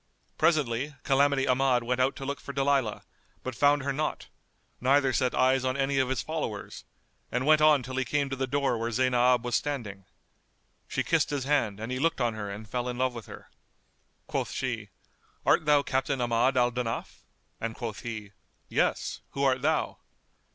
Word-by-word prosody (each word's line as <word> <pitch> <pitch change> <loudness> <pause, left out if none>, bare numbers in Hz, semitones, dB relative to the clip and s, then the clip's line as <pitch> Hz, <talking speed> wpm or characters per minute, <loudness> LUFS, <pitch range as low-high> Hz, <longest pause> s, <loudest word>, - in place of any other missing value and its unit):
Presently, 145 -4 +1
Calamity 140 0 +3
Ahmad 125 -1 +3
went 125 +2 0
out 130 +2 +2
to 135 - -7
look 140 0 -3
for 140 - -8
Dalilah, 135 -5 +1 0.4
but 130 - -4
found 145 +2 +3
her 140 0 -1
not, 155 +2 -3 0.5
neither 135 +1 +3
set 125 0 +1
eyes 130 0 +3
on 130 +1 0
any 135 0 +1
of 130 -1 +1
his 130 -3 -1
followers, 150 -10 -5 0.5
and 125 +2 -1
went 155 0 +5
on 150 -3 +5
till 130 +2 -6
he 130 - +2
came 140 +2 0
to 135 - -3
the 135 0 -2
door 140 -3 0
where 115 +1 -1
Zaynab 125 0 +3
was 120 - -3
standing. 110 -9 -2 0.8
She - - -1
kissed - - +2
his 145 -3 -2
hand 130 -8 +1
and 110 +3 -5
he 130 - -2
looked 165 +1 +1
on 120 -2 +1
her 105 -2 -5
and 105 +2 -7
fell 125 +3 -2
in 125 - -4
love 130 0 +1
with 115 -4 -8
her. - - -12 0.7
Quoth - - -2
she, 115 -5 -3 0.6
"Art - - +4
thou 145 -1 +5
Captain 135 0 -1
Ahmad 120 +2 +2
al 125 0 +3
Danaf?"; 120 -2 -4 0.4
and 115 -1 -3
quoth 115 -5 -5
he, 110 -4 -6 0.4
"Yes: - - 0
who 140 - -2
art 130 -2 +2
thou?" 155 +2 0
130 Hz, 185 wpm, -28 LUFS, 120-140 Hz, 0.8 s, went